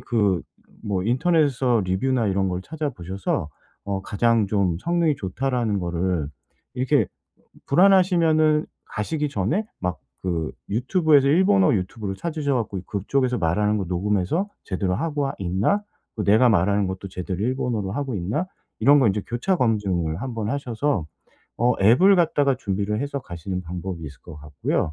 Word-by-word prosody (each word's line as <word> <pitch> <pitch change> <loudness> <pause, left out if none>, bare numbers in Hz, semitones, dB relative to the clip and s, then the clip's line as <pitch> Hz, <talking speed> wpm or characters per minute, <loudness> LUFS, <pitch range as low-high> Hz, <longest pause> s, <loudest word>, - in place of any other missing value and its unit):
그 100 - +1 0.4
뭐 100 -3 -1
인터넷에서 130 - +2
리뷰나 115 +6 0
이런 95 0 +1
걸 90 0 -2
찾아 155 +2 -3
보셔서 90 - -3 0.4
어 100 -1 -3
'가장 110 +1 +2
좀 95 -4 +1
성능이 170 - +1
좋다.'라는 115 +1 -1
거를 85 -3 -1 0.5
이렇게 130 0 +2
어 - - -4 0.6
불안하시면은 165 -3 +4 0.2
가시기 150 +8 -2
전에 140 - -1 0.2
막 90 -1 -2 0.2
그 85 -4 -2 0.2
유튜브에서 140 - +3
일본어 190 - +4
유튜브를 95 +1 -3
찾으셔 155 - -2
갖고 105 -6 -2
'그쪽에서 125 +5 0
말하는 105 +5 +1
거 100 - -1
녹음해서 100 - 0
제대로 95 -1 -1
하고 145 - -1
하 135 - -2
있나? 100 - 0 0.3
그 105 - -3
내가 110 +5 +5
말하는 100 0 +2
것도 95 +1 -5
제대로 90 0 -5
일본어로 120 -4 -1
하고 135 +3 -3
있나?' 105 - -2 0.3
이런 140 +6 +5
거 120 - +4
이제 100 +1 0
교차 180 +11 0
검증을 100 - 0
한번 115 -5 -3
하셔서 130 - -1 0.5
어 120 0 +3
앱을 130 - +6
갖다가 145 -5 +2
준비를 105 -2 -2
해서 140 0 -3
가시는 90 -1 -5
방법이 90 +1 -6
있을 70 -2 -10
것 85 -4 -11
같고요. 75 +1 -2
110 Hz, 340 characters per minute, -23 LUFS, 95-140 Hz, 0.6 s, 앱을